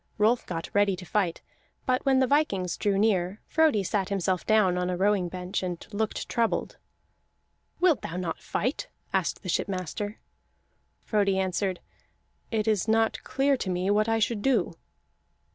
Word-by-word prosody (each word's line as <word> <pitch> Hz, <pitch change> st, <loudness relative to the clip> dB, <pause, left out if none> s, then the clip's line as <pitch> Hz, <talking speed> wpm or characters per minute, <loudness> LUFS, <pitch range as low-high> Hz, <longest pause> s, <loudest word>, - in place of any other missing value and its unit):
Rolf 220 Hz, +3 st, +2 dB
got 165 Hz, -2 st, -4 dB
ready 205 Hz, -1 st, +3 dB
to 180 Hz, 0 st, -10 dB
fight; 180 Hz, -3 st, 0 dB, 0.4 s
but 255 Hz, 0 st, +1 dB
when 265 Hz, -1 st, +5 dB
the 260 Hz, -, +4 dB
vikings 220 Hz, -, +1 dB
drew 200 Hz, -2 st, 0 dB
near, 195 Hz, -2 st, +1 dB
Frodi 310 Hz, -10 st, +3 dB
sat 190 Hz, 0 st, -1 dB
himself 190 Hz, -2 st, 0 dB
down 215 Hz, -5 st, +4 dB
on 180 Hz, 0 st, -1 dB
a 180 Hz, -, -1 dB
rowing 195 Hz, -2 st, +2 dB
bench, 180 Hz, +1 st, -3 dB
and 180 Hz, -2 st, -3 dB, 0.2 s
looked 215 Hz, +1 st, -2 dB
troubled. 230 Hz, -1 st, -1 dB, 1.0 s
"Wilt 340 Hz, -, +3 dB
thou 165 Hz, -, -5 dB
not 180 Hz, -2 st, -3 dB
fight?" 255 Hz, +7 st, -2 dB, 0.3 s
asked -, -, 0 dB
the -, -, -5 dB
shipmaster. 200 Hz, +2 st, -2 dB, 0.9 s
Frodi 200 Hz, -3 st, +2 dB
answered: 190 Hz, 0 st, -1 dB, 0.7 s
"It 220 Hz, -1 st, -1 dB
is 215 Hz, -1 st, +1 dB
not 225 Hz, 0 st, +2 dB
clear 270 Hz, +2 st, +2 dB
to 200 Hz, -, -3 dB
me 180 Hz, +2 st, 0 dB
what 215 Hz, +2 st, +2 dB
I 225 Hz, -, +2 dB
should 225 Hz, -1 st, 0 dB
do." 270 Hz, +3 st, +1 dB
205 Hz, 160 wpm, -27 LUFS, 185-225 Hz, 1.0 s, when